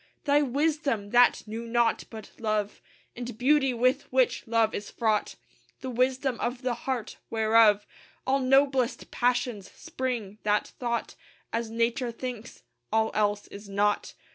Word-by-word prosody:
Thy 290 0 +4
wisdom! 280 -6 0
that 245 0 +5
knew 225 +2 -5
naught 235 0 +1
but 220 -2 -10
love 215 -2 -1 0.3
And 245 -1 -6
beauty, 270 +1 +3
with 250 +2 +1
which 255 -2 +1
love 225 -1 +2
is 205 - -5
fraught; 220 -3 0 0.5
The 260 - -4
wisdom 255 +1 0
of 245 +2 -3
the 250 -1 0
heart 240 -1 -4
whereof 220 -2 +4 0.4
All 270 +1 +2
noblest 270 -1 +2
passions 245 -4 0
spring 230 -6 -4
that 210 0 +1
thought 235 -2 -2 0.4
As 230 -1 -1
Nature 235 +2 0
thinks, 240 -1 -7 0.3
"All 220 0 +2
else 205 -1 +1
is 200 0 -10
naught." 205 +1 0
235 Hz, 140 wpm, -27 LUFS, 220-255 Hz, 0.5 s, that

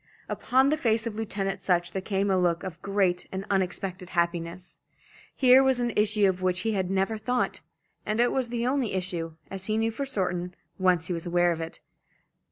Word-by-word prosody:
Upon 265 +2 +2
the 305 - +2
face 225 -1 +2
of 230 - -3
Lieutenant 200 -3 -3
Sutch 175 -1 +1
there 190 - -3
came 195 0 0
a - - +3
look 175 -1 +1
of 180 -3 -7
great 195 -3 0
and 190 +1 -4
unexpected 185 -1 -2
happiness. 170 +1 -2 0.6
Here 260 0 +7
was 265 -2 +3
an 240 -2 0
issue 210 -1 +3
of 185 -1 -1
which 185 -1 +1
he 225 - 0
had 190 -3 -1
never 195 +3 0
thought; 250 +3 -1 0.4
and 215 +1 -2
it 240 0 +4
was 260 -3 0
the 235 0 -2
only 255 -4 0
issue, 175 -3 -3 0.2
as 190 -1 -5
he 215 0 +1
knew 225 0 +1
for 275 +5 -4
certain, 180 -6 -2 0.2
once 180 -3 +3
he 180 - -2
was 170 +1 -4
aware 175 0 +3
of 165 -1 -3
it. 165 - -7
195 Hz, 200 wpm, -27 LUFS, 180-225 Hz, 0.6 s, Here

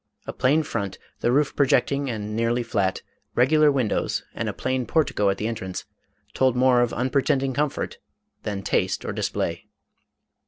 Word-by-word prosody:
A - - -5
plain 145 +5 +2
front, 100 -8 -3 0.2
the 120 - +1
roof 140 +2 +2
projecting 140 0 +2
and 105 -2 -4
nearly 115 +2 +1
flat, 100 -5 -1 0.3
regular 150 +4 +5
windows, 130 -6 0
and - - -2
a - - -1
plain 130 -2 -2
portico 115 -9 +2
at 100 - 0
the 105 - -2
entrance, 95 -5 -5 0.5
told 130 -2 +2
more 125 -1 +4
of 120 - +1
unpretending 130 +1 +1
comfort 150 +1 -2 0.4
than 100 -2 -4
taste - - 0
or - - -3
display. - - -2
125 Hz, 155 wpm, -24 LUFS, 110-135 Hz, 0.5 s, regular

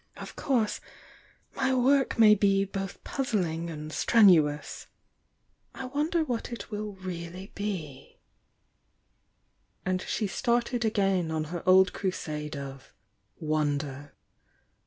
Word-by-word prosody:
Of - - -9
course 235 -6 0 0.7
my 265 -1 +1
work 270 +2 +3
may 220 -2 +8
be 195 -1 +3
both 195 -1 -6
puzzling 180 - -2
and 155 -1 -7
strenuous— 165 -10 +3 0.9
I 265 - -6
wonder 305 +6 0
what 245 -5 -3
it 235 - -7
will 210 0 -4
really 185 0 -7
be?",, 180 -10 -5 0.8
„ - - -44
And 185 0 0
she 215 - -2
started 240 +3 0
again 195 -6 +1
on 160 -1 -1
her 175 - -3
old 190 0 +6
crusade 150 -5 -4
of 135 -1 -9 0.4
won 150 -2 0
der." 140 0 -7
195 Hz, 115 wpm, -28 LUFS, 160-230 Hz, 0.9 s, may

